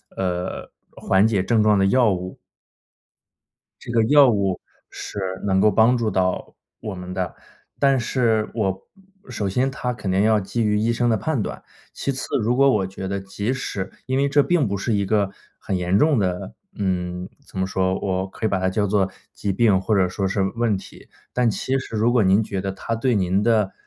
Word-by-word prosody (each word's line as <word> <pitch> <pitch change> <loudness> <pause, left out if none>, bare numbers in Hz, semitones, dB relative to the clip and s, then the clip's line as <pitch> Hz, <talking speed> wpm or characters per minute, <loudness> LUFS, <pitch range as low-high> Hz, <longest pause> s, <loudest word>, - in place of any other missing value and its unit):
呃， 90 -1 -3 0.2
缓 95 +3 +2
解 100 -5 +1
症 110 +2 +2
状 105 -1 +4
的 95 - +3
药 120 +1 +4
物。 90 0 -6 1.4
这 - - -7
个 115 -1 +3
药 145 +1 +6
物 100 -4 0 0.3
是 - - -8 0.3
能 95 -1 +2
够 105 +1 +5
帮 115 +5 +4
助 115 -2 0
到 95 -1 -1 0.2
我 105 -4 -6
们 90 0 -7
的， 90 -2 -3 0.4
但 135 -2 +3
是， 115 -3 +1
我 95 -4 -2 0.4
首 100 - -3
先 125 +7 +1
它 125 -3 -3
肯 100 -5 -4
定 95 +1 +2
要 110 -1 +4
基 100 +4 -2
于 105 -1 +2
医 110 +2 +1
生 120 +1 +1
的 110 - +2
判 155 -3 -1
断， - - -5 0.3
其 140 - -2
次， 130 - -5 0.2
如 120 +3 +1
果 140 +1 +5
我 100 -7 +1
觉 95 0 -6
得 100 +1 -2
即 100 +5 -3
使 100 -7 -4
因 130 0 -1
为 140 +1 +2
这 145 0 +4
并 170 -9 +2
不 100 0 -2
是 110 +3 -1
一 100 -1 +1
个 100 -1 +1 0.3
很 95 - -3
严 90 +2 +1
重 150 +2 +3
的 90 -2 -2 0.2
嗯， 90 -1 -3 0.2
怎 - - -11
么 95 - +1
说， 95 -1 0
我 95 -1 -1
可 110 - -5
以 - - +2
把 95 - 0
它 95 - +1
叫 105 +2 0
做 95 -1 +1 0.2
疾 100 - -2
病 100 -2 +3
或 105 +2 +1
者 95 -2 +3
说 95 +1 -2
是 95 +1 -1
问 115 -4 +1
题。 - - -13 0.2
但 125 -2 +2
其 130 +5 -1
实 115 - -7
如 115 +3 +2
果 120 -4 +3
您 95 +4 +4
觉 95 -2 -4
得， 95 0 -3
它 115 +4 -4
对 120 0 +1
您 95 0 +1
的 110 -4 +2
105 Hz, 225 characters per minute, -22 LUFS, 95-120 Hz, 1.4 s, 药